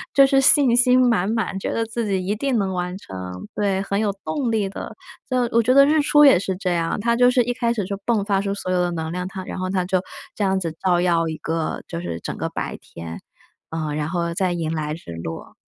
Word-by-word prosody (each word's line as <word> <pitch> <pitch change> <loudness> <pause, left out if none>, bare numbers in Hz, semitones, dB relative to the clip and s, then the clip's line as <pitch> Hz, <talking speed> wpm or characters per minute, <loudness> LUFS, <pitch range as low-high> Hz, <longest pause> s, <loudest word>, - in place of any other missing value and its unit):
就 275 - +8
是 270 0 +3
信 265 -2 +5
心 250 +1 +5
满 205 -5 +2
满， 220 -4 -1
觉 - - -3
得 230 - -1
自 225 -1 -3
己 190 -2 -1
一 205 +3 0
定 265 +1 0
能 190 -2 0
完 180 +1 -3
成。 90 - -8
对， 195 -1 0
很 200 +1 -1
有 210 -2 +1
动 270 -6 -1
力 215 -3 +1
的。 195 - -7 0.3
这 255 - +1 0.2
我 230 - +6
觉 240 +3 +2
得 275 0 +8
日 305 +1 +3
出 295 0 +5
也 270 -10 +7
是 190 -1 -2
这 185 -2 -1
样， 165 +4 -1
它 235 +2 +1
就 245 +1 +5
是 250 -1 +3
一 245 - -1
开 235 -1 0
始 210 -5 -1
就 200 +1 -3
迸 220 -4 +1
发 200 -2 +1
出 200 0 -2
所 185 -2 -4
有 180 -1 +2
的 175 - +1
能 160 -1 -3
量， 180 +1 -3
它 190 0 -6
然 - - -6
后 185 0 -2
它 185 -2 0
就 185 0 +1 0.3
这 210 - -3
样 190 0 +2
子 165 -3 -4
照 180 -2 +3
耀 170 -2 +2
一 160 - -4
个， 160 0 -3
就 170 0 -5
是 85 - -4
整 - - -5
个 - - -3
白 - - -4
天， 85 0 -9 0.5
呃， 155 -2 -3
然 150 0 -2
后 170 -1 -1
再 185 0 0
迎 165 -2 -2
来 155 -1 -2
日 165 - -11
落。 80 - -7
190 Hz, 275 characters per minute, -22 LUFS, 170-230 Hz, 0.5 s, 就